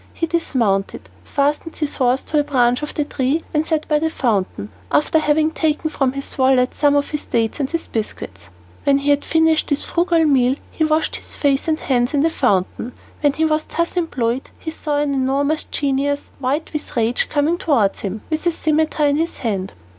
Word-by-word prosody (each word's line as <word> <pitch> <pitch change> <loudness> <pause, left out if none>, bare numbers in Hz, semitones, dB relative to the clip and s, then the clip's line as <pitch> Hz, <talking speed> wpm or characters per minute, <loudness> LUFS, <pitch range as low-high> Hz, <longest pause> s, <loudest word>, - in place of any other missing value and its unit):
He 330 - 0
dismounted, 235 - -1
fastened 295 +3 -1
his 300 -3 -3
horse 255 +1 +2
to 305 - 0
a - - +3
branch 250 -3 +2
of 300 - -5
the 295 - 0
tree, 280 +3 -1
and 310 +1 +1
sat 315 -2 -1
by 300 -1 +2
the 320 +1 0
fountain, 200 - -1 0.2
after 310 +2 +3
having 310 +1 +2
taken 315 -1 0
from 270 -4 0
his 275 0 -4
wallet 260 -1 +3
some 290 -1 +3
of 285 0 0
his 300 - -3
dates 225 +3 -1
and 275 -1 -1 0.2
biscuits. 100 - -5 0.3
When 280 -1 +4
he 280 +1 +1
had 285 0 +2
finished 320 -1 +2
this 285 -1 +1
frugal 340 -1 +2
meal 265 -3 +3 0.2
he 315 - -1
washed 310 0 +1
his - - -7
face 280 0 +1
and 315 -1 +1
hands 250 +1 +1
in 280 - +3
the 325 - +2
fountain. 230 - 0 0.3
When 290 -2 +3
he 320 +2 +1
was 310 0 +1
thus 335 +2 -2
employed 260 -8 -1
he 320 - -6
saw 300 -2 -2
an 290 -1 0
enormous 275 +3 0
genius, 285 0 -1
white 280 +5 -2
with 300 -4 -5
rage, 230 +1 +1
coming 305 +4 +1
towards 230 -11 +2
him, 205 +1 -4
with 315 +3 -1
a - - +4
scimitar 310 -1 +1
in 285 0 +2
his 330 +2 -2
hand. 195 -5 -3
285 Hz, 200 wpm, -20 LUFS, 255-310 Hz, 0.3 s, When